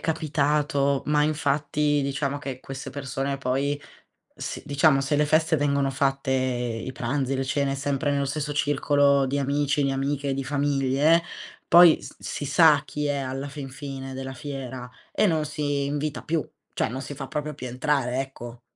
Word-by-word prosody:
capitato, 150 -3 +1
ma 150 0 +3
infatti 150 0 +1
diciamo 140 +1 -2
che 135 -2 -6
queste 135 0 -7
persone 135 0 -3
poi 140 +2 -1 0.6
si - - -5
diciamo 140 0 +4
se 135 +2 -1
le 150 +1 +3
feste 155 +2 +3
vengono 140 -1 +1
fatte 135 0 0
i 125 -2 -1
pranzi, 130 +1 -1
le 135 - -1
cene 140 0 0
sempre 145 +1 -1
nello 140 0 +1
stesso 145 +1 -2
circolo 145 -1 +3
di 140 +2 -1
amici, 140 +1 +1
di 135 - +1
amiche, 140 0 -1
di 135 - -2
famiglie, 140 +3 +2 0.5
poi 170 -1 +8
s - - -10
si 145 - -5
sa 150 0 +5
chi 150 0 -3
è 145 -1 0
alla 135 +1 -4
fin 140 -1 -7
fine 135 -1 -7
della 135 0 -5
fiera 130 -1 -6 0.2
e - - +3
non 160 -3 +1
si 145 -2 -1
invita 145 +1 -2
più; 160 -3 -1 0.3
cioè - - 0
non 130 +4 -5
si 140 +2 -6
fa 135 -1 -7
proprio 150 0 -3
più 130 -2 -6
entrare, 130 0 0
ecco. 120 -3 -8
140 Hz, 170 wpm, -25 LUFS, 135-145 Hz, 0.6 s, poi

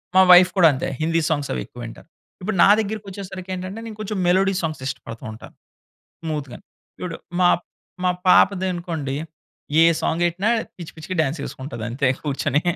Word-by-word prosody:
మా 190 - +8
వైఫ్ 180 +1 +8
కూడా 175 -3 +7
అంతే 130 - -3
హిందీ 165 +1 +1
సాంగ్స్ 145 -3 -1
అవి - - -2
ఎక్కువింటారు. 120 +3 -10 0.3
ఇప్పుడు 195 0 -2
నా - - +7
దగ్గరికచ్చేసరికి 195 -3 -5
ఏంటంటే, 185 +4 -6
నేను 215 - -9
కొంచెం 215 -1 -4
మెలోడీ 190 +2 +3
సాంగ్స్ 155 -4 -3
ఇష్టపడుతుంటాను. 115 -3 -8 0.7
స్మూత్‌గా. 150 -6 -4 0.4
చూడు 175 -2 -5 0.2
మా 175 - +6 0.5
మా 180 - +3 0.2
పాపది 185 +1 +5
అనుకోండి. 165 -6 -4 0.7
ఏ - - +8 0.2
సాంగ్ 165 - -1
గెట్టినా 175 +5 +1 0.3
పిచ్చి 170 -3 -8
పిచ్చిగా 160 +4 -6
డాన్స్ 150 +1 -1
చేసుకుంటది 130 -5 -7
అంతే 130 +3 0 0.2
కూర్చొని. 145 0 0
170 Hz, 150 wpm, -22 LUFS, 145-185 Hz, 0.7 s, మా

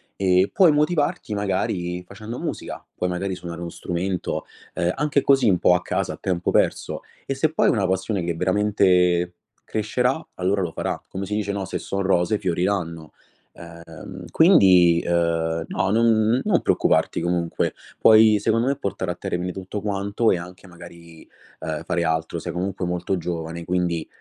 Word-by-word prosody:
e 95 0 +2
puoi 185 -5 +6
motivarti 150 -3 0
magari 95 -3 -2
facendo 110 +5 -8
musica: - - -5
puoi 90 - -1
magari 95 +1 -2
suonare 85 -1 -8
uno 85 - -4
strumento, 90 +1 -3 0.3
uhm, 85 +1 0
anche 150 0 +1
così 135 -5 +4
un 90 - +2
po' 90 - +5
a 90 - 0
casa - - -2
a - - -10
tempo 90 -2 -1
perso, - - 0 0.2
e - - -2
se 150 +3 +1
poi 160 - +2
è - - +5
una 100 -5 +1
passione 95 +1 -1
che 85 -1 -2
veramente 90 -2 +2 0.3
crescerà 125 +7 -1
allora 95 +2 0
lo 85 -3 -2
farà. - - -3
Come 95 +1 -5
si 105 +2 -3
dice, 105 -1 -1
no, 100 -1 -3
"se 95 - -4
son 100 - -3
rose 95 +2 +2
fioriranno". 85 -3 -2 0.4
Ehm, 85 +2 -11
quindi, 90 - +5
uhm, 85 -1 0
no, 95 - -1
non 115 +2 +3
non 205 -5 +2
preoccuparti 80 +1 +1
comunque. 85 -1 -1 0.3
Poi 110 -1 +6
secondo 115 +3 +1
me 140 - +1
portare 95 -6 -3
a - - -5
termine 90 +1 -3
tutto 95 +3 -6
quanto 100 +2 0
e 90 - +2
anche 90 +2 -11
magari, 85 -2 -14 0.3
uhm, - - -4
fare 85 - -1
altro. 80 0 -1
Sei - - -5
comunque 95 +1 -3
molto 90 +2 -1
giovane 85 -1 -5
quindi, 90 -3 -1
95 Hz, 170 wpm, -23 LUFS, 85-105 Hz, 0.4 s, puoi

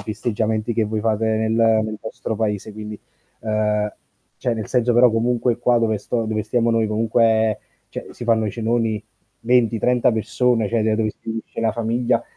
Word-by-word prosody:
festeggiamenti 110 0 -2
che 115 -1 +1
voi 110 0 -2
fate 110 0 0
nel 110 0 +1
nel 110 -1 +2
vostro 110 0 -5
paese 105 -1 -2
quindi, 105 0 -7 0.4
ehm, 105 -1 0 0.5
cioè 120 - -1
nel 110 -2 -5
senso 125 -1 +2
però 120 0 +6
comunque 120 +1 +1
qua 120 0 +3
dove 110 -2 +1
sto 115 +3 -2
dove 110 -1 -1
stiamo 115 +2 +1
noi 115 -1 +2
comunque 110 0 +2 0.3
cioè - - -7
si 120 - -8
fanno 110 -2 +2
i - - -1
cenoni 115 -2 -1 0.4
20, 115 -2 +2
30 125 0 +3
persone, 110 +1 +1
cioè 115 0 +1
d 110 0 +2
dove 110 0 0
si - - -24
riunisce 110 0 -5
la 110 -1 +1
famiglia, 115 +1 0
110 Hz, 180 wpm, -21 LUFS, 110-115 Hz, 0.5 s, però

